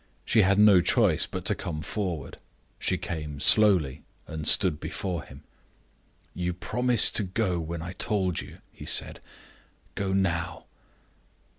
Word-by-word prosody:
She 110 Hz, -, +3 dB
had 100 Hz, +1 st, +2 dB
no 105 Hz, -3 st, +6 dB
choice 90 Hz, -, +2 dB
but -, -, -7 dB
to -, -, +1 dB
come 75 Hz, -2 st, -6 dB
forward. 90 Hz, -6 st, -5 dB, 0.4 s
She -, -, 0 dB
came 75 Hz, -3 st, -6 dB
slowly 85 Hz, -9 st, +4 dB, 0.2 s
and 80 Hz, -1 st, -5 dB
stood 90 Hz, -7 st, +5 dB
before 90 Hz, -3 st, -5 dB
him. 70 Hz, +3 st, -15 dB, 0.9 s
"You 90 Hz, 0 st, -3 dB
promised 125 Hz, +6 st, +1 dB
to 105 Hz, -, 0 dB
go 95 Hz, -2 st, -2 dB
when 80 Hz, 0 st, -6 dB
I 85 Hz, +2 st, -7 dB
told 95 Hz, -3 st, -2 dB
you," -, -, -13 dB
he -, -, -11 dB
said. -, -, +2 dB, 0.7 s
"Go 100 Hz, -1 st, -3 dB
now." 85 Hz, -4 st, -2 dB
90 Hz, 140 wpm, -26 LUFS, 80-100 Hz, 0.9 s, no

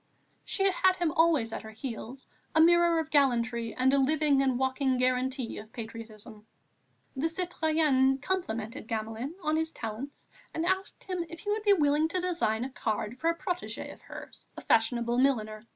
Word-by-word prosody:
She 390 Hz, -, -1 dB
had 375 Hz, +1 st, +3 dB
him 345 Hz, -3 st, 0 dB
always 305 Hz, -9 st, +2 dB
at -, -, -4 dB
her 220 Hz, -, -10 dB
heels, 240 Hz, +3 st, -7 dB, 0.3 s
a -, -, +5 dB
mirror 340 Hz, +1 st, +5 dB
of 320 Hz, -1 st, -2 dB
gallantry 235 Hz, -5 st, +1 dB
and 260 Hz, +1 st, +3 dB
a 280 Hz, -, +4 dB
living 290 Hz, 0 st, +3 dB
and 260 Hz, -2 st, +1 dB
walking 260 Hz, 0 st, +1 dB
guarantee 255 Hz, 0 st, 0 dB
of 215 Hz, +1 st, -12 dB
patriotism. 225 Hz, -2 st, -9 dB, 0.7 s
The 295 Hz, +5 st, 0 dB
citoyenne 315 Hz, -6 st, +2 dB
complimented 240 Hz, -, -3 dB
Gamelin 225 Hz, +7 st, -4 dB
on 310 Hz, +1 st, +1 dB
his 320 Hz, 0 st, -1 dB
talents 230 Hz, +4 st, -7 dB, 0.3 s
and 325 Hz, -, -1 dB
asked 375 Hz, +2 st, -2 dB
him 365 Hz, -2 st, -3 dB
if 335 Hz, -, -9 dB
he 415 Hz, -, -2 dB
would 430 Hz, +1 st, 0 dB
be 410 Hz, -1 st, +5 dB
willing 300 Hz, -2 st, +3 dB
to 365 Hz, +3 st, -2 dB
design 325 Hz, -11 st, 0 dB
a 270 Hz, -, -6 dB
card 220 Hz, 0 st, -3 dB
for 330 Hz, -, +1 dB
a 335 Hz, -, -1 dB
protégée 360 Hz, 0 st, -4 dB
of -, -, -19 dB
hers, -, -, -11 dB
a -, -, -6 dB
fashionable 235 Hz, +1 st, +2 dB
milliner. 220 Hz, -5 st, 0 dB
270 Hz, 175 wpm, -29 LUFS, 230-325 Hz, 0.7 s, a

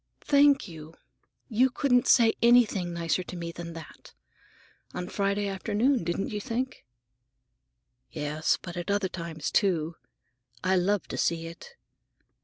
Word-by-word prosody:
"Thank 285 Hz, -4 st, +4 dB
you. 160 Hz, -2 st, -11 dB, 0.5 s
You 250 Hz, +2 st, +3 dB
couldn't 250 Hz, -1 st, +2 dB
say 230 Hz, -3 st, +5 dB
anything 230 Hz, -7 st, +4 dB
nicer 170 Hz, +1 st, -1 dB
to 180 Hz, -, -8 dB
me 170 Hz, -1 st, -5 dB
than 170 Hz, 0 st, -8 dB
that. 165 Hz, -1 st, -12 dB, 0.8 s
On 180 Hz, -, -4 dB
Friday 200 Hz, +1 st, -1 dB
afternoon, 215 Hz, +6 st, 0 dB
didn't 175 Hz, +4 st, -2 dB
you 210 Hz, -1 st, -3 dB
think?" 255 Hz, -, -4 dB, 1.2 s
"Yes, 150 Hz, +1 st, -1 dB
but 175 Hz, -1 st, -8 dB
at 175 Hz, +2 st, -5 dB
other 200 Hz, -2 st, +1 dB
times, 170 Hz, -4 st, -5 dB
too. 170 Hz, -5 st, +1 dB, 0.7 s
I 190 Hz, +1 st, +2 dB
love 190 Hz, +2 st, +1 dB
to -, -, -4 dB
see 165 Hz, -1 st, 0 dB
it. 170 Hz, -, -11 dB
190 Hz, 135 wpm, -28 LUFS, 170-230 Hz, 1.2 s, say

